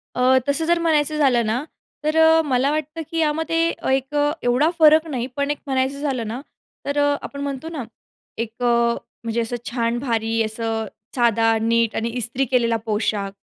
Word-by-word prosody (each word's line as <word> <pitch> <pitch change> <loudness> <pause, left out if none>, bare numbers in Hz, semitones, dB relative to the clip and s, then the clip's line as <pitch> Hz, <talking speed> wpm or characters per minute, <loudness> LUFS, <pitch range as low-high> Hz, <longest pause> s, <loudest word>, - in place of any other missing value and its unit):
अ, 255 +1 +4
तसं 300 +3 0
जर 345 +1 +2
म्हणायचं 310 -2 +1
झालं 255 -6 +3
ना, 225 +5 -1 0.4
तर 310 +1 0
अ, 320 0 +6
मला 270 0 +1
वाटतं 310 +1 -3
की 330 - -3
यामध्ये 320 +1 0 0.3
एक 270 +2 -1 0.3
एवढा 250 +6 +3
फरक 315 +1 +6
नाही, 255 -5 -3
पण 280 0 0
एक 295 - -2
म्हणायचं 265 +1 0
झालं 260 -6 -2
ना 240 +4 -5 0.4
तर 285 +1 -2
अ, 290 0 +3
आपण 280 - -7
म्हणतो 280 +2 -4
ना, 305 -7 -5 0.5
एक 230 +1 -5
अ, - - +2 0.6
म्हणजे 230 0 -1
असं 230 +1 -3
छान 235 -1 -1
भारी 225 -3 0
असं 225 0 -3 0.3
साधा 225 -2 +3
नीट 230 0 +1
आणि 230 +1 -1
इस्त्री 245 +2 -2
केलेला 235 -3 +1
पोशाख 210 -2 -1
260 Hz, 175 wpm, -22 LUFS, 230-295 Hz, 0.6 s, अ